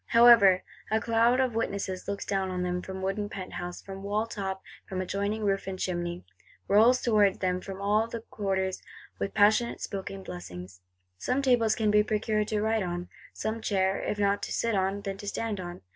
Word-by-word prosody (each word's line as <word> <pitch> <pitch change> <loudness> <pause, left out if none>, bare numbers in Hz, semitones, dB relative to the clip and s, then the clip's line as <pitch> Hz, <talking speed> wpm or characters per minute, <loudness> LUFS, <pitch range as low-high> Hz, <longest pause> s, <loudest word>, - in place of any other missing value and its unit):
However, 230 -6 +7 0.3
a 220 +1 +2
cloud 230 +2 +3
of 260 -2 +1
witnesses 200 -4 -3
looks 200 0 -3
down 195 -1 -1
on 180 -1 -2
them, 180 0 -1
from 190 +1 -7
wooden 205 +2 -1
penthouse, 180 -2 -6
from 195 0 -8
wall 205 +2 0
top, 195 -4 -4 0.3
from 185 - -3
adjoining 200 +3 -2
roof 195 -1 0
and 190 -1 -4
chimney; 175 - -3 0.4
rolls 225 +5 +5
towards 210 -4 +4
them 180 -1 -1
from 195 0 -7
all 210 +2 +2 0.2
quarters, 190 -2 -1 0.4
with 200 - -3
passionate 215 +3 +4
spoken 195 -1 -5
blessings. 90 - -9 0.4
Some 265 +2 0
table 245 -4 +3
can 215 -1 +2
be 210 0 +6
procured 215 0 0
to 215 -1 0
write 220 0 +1
on; 175 -1 -4 0.2
some 220 +1 -3
chair, 190 -2 +1
if 210 - -2
not 200 0 +1
to - - -5
sit 230 -1 0
on, 195 +1 0
then 195 -1 -4
to 205 - -8
stand 210 0 -2
on. 175 -1 -7
200 Hz, 185 wpm, -28 LUFS, 190-220 Hz, 0.4 s, However